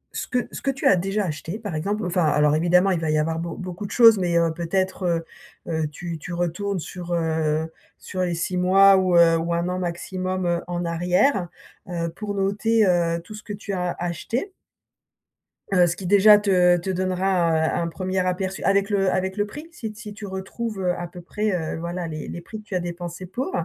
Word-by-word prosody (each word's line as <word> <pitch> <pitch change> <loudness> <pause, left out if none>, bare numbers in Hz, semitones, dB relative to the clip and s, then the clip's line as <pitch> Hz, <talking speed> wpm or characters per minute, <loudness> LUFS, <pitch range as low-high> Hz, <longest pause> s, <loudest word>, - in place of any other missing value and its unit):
ce - - -3
que 250 -1 -1
ce - - -7
que 275 - -1
tu 270 - -6
as - - +6
déjà 195 +3 -1
acheté, 160 +3 -4
par 205 -6 -5
exemple, 200 +6 -2
enfin 180 -1 +1
alors 150 0 +3
évidemment 180 +4 +3
il 175 - +1
va 160 - -2
y 155 - +2
avoir 160 +1 0
beau 170 0 -4
beaucoup 185 +2 -6
de - - -12
choses 225 -3 +7
mais, 175 -2 +1
heu, 165 -1 +2
peut-être, 185 +3 -1
heu 165 -1 0 0.5
heu, 160 -1 0
tu 170 +2 -6
tu 175 +3 -7
retournes 175 +3 -2
sur, 175 +1 -6
heu, 160 -1 0 0.3
sur 185 - -5
les 175 -2 0
6 175 +2 -2
mois 195 +2 +6
ou, 185 -2 +2
heu, 165 -1 +6
ou 170 +1 -1
1 170 +1 -1
an 180 0 -2
maximum, 185 +1 -3
heu, 170 0 +1
en 175 0 -3
arrière, 180 +4 +1 0.4
heu, 170 -1 -2
pour 205 +4 -5
noter, 210 +3 +2
heu, 170 -2 +2
tout 215 - -11
ce 210 - -9
que 205 - -6
tu 200 0 -6
as 180 -1 -2
acheté? 225 - -3 1.2
Heu, 180 -1 +6
ce 175 0 -1
qui 190 - -7
déjà 205 +2 +7
te 180 -3 +4
te 175 +2 -5
donnera, 185 -1 +1
heu, 160 0 +2
un 175 - 0
un 170 - -1
1er 185 +3 -2
aperçu 185 +1 -2
avec 200 +1 +2
le 195 -2 +2
avec 190 0 -1
le 205 0 0
prix 295 +10 -9
si 225 -10 -6
t 215 - -15
si 210 -2 -8
tu 210 0 -8
retrouves, 195 +3 -5
heu, 180 -1 +1
à 175 - -4
peu 175 +1 -11
près, 210 +4 -2
heu, 165 -4 -2
voilà 170 +1 -4
les 155 -2 -6
les - - -6
prix 215 +5 -9
que - - -13
tu 210 -3 -6
as - - +2
dépensés 175 +1 -6
pour. 240 +9 -4
180 Hz, 230 wpm, -23 LUFS, 170-195 Hz, 1.2 s, choses